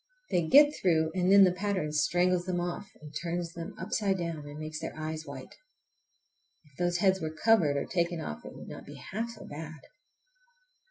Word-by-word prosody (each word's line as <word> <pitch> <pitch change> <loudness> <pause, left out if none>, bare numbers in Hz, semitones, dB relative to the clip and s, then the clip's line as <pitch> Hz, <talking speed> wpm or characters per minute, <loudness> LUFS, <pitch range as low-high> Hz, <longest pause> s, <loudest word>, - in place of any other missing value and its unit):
They 170 -3 +2
get 290 - +7
through, 160 -3 +2
and 185 0 +2
then 200 0 +9
the 185 - +5
pattern 185 -4 -1
strangles 175 +4 +2
them 180 -1 -1
off 175 +3 -4
and 150 -1 -12
turns 170 0 -3
them 170 0 -7
upside 200 -3 0
down, 165 -4 -4
and 145 0 -8
makes 155 0 -5
their - - -6
eyes 155 0 -4
white! - - -9 1.1
If 150 - -24
those 175 0 +1
heads 190 0 +3
were 160 - -2
covered 160 -3 +3
or 140 - -1
taken 170 -1 -1
off 75 - -6
it - - -10
would - - -10
not - - -9
be - - -9
half 225 +5 -4
so 235 - -10
bad. 155 +1 -8
175 Hz, 195 wpm, -30 LUFS, 155-190 Hz, 1.1 s, then